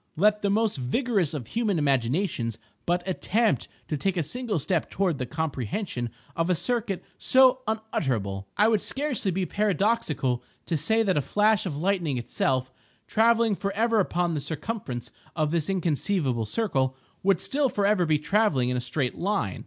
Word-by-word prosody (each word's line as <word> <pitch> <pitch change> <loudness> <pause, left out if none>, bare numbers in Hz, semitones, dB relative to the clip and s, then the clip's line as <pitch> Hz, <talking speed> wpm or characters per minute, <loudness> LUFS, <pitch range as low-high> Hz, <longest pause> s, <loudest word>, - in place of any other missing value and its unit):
Let 210 +5 +3
the 200 - +1
most 215 -2 +1
vigorous 180 - 0
of 130 -6 -4
human 215 - 0
imaginations 135 - 0 0.3
but 175 +1 0
attempt 215 +4 +1 0.2
to 155 - -1
take 190 +5 -1
a 170 - +1
single 230 - -1
step 165 +2 0
toward 180 -7 0
the 125 - -3
comprehension 135 - -3 0.3
of 165 +1 0
a 180 - +3
circuit 220 -1 -1 0.2
so 260 0 +6
unutterable! 130 - -2
It 215 +2 +5
would 215 - +2
scarcely 270 -8 -2
be 185 +1 0
paradoxical 190 - 0 0.2
to 170 - -1
say 220 +10 +2
that 190 -6 +1
a - - +3
flash 210 +5 +2
of 145 -5 -4
lightning 170 -5 0
itself, 130 +2 0 0.3
travelling 225 - +3
forever 215 +4 +1
upon 175 -3 0
the 150 - -2
circumference 145 - -5 0.2
of 155 -2 0
this 165 -1 0
inconceivable 160 - 0
circle, 135 - 0 0.2
would 195 -2 +3
still 280 -1 +1
forever 200 -5 +2
be 155 -1 +3
travelling 150 - +2
in 125 - 0
a - - -1
straight 125 +1 -1
line. 185 - -1
180 Hz, 160 wpm, -26 LUFS, 140-215 Hz, 0.3 s, so